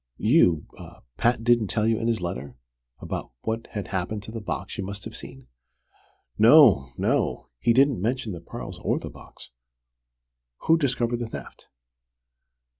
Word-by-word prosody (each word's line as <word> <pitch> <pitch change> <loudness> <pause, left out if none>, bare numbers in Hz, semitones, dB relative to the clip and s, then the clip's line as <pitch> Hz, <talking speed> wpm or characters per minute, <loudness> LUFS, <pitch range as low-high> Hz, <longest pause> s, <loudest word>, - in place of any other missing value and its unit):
You 105 - +3 0.5
Pat 120 -1 +1
didn't 120 -2 +3
tell 105 +2 0
you 115 0 +2
in 115 - -2
his 115 -4 0
letter, 70 -7 -5 0.4
about - - -5
what 110 +4 -3
had 105 -3 -4
happened 100 +2 -3
to 110 - -9
the 115 0 -6
box 85 -8 -5
you - - -1
must 100 +1 -7
have - - -8
seen?" 65 -1 -8 0.9
"No 110 - +7
no. - - 0
He 115 - +2
didn't 135 -3 +3
mention 120 +1 -1
the 85 -3 -7
pearls 85 - -8
or - - 0
the - - -7
box. - - -14 1.1
Who 165 - +4
discovered 120 -5 0
the 120 - -3
theft?" - - -10
110 Hz, 155 wpm, -25 LUFS, 95-120 Hz, 1.1 s, No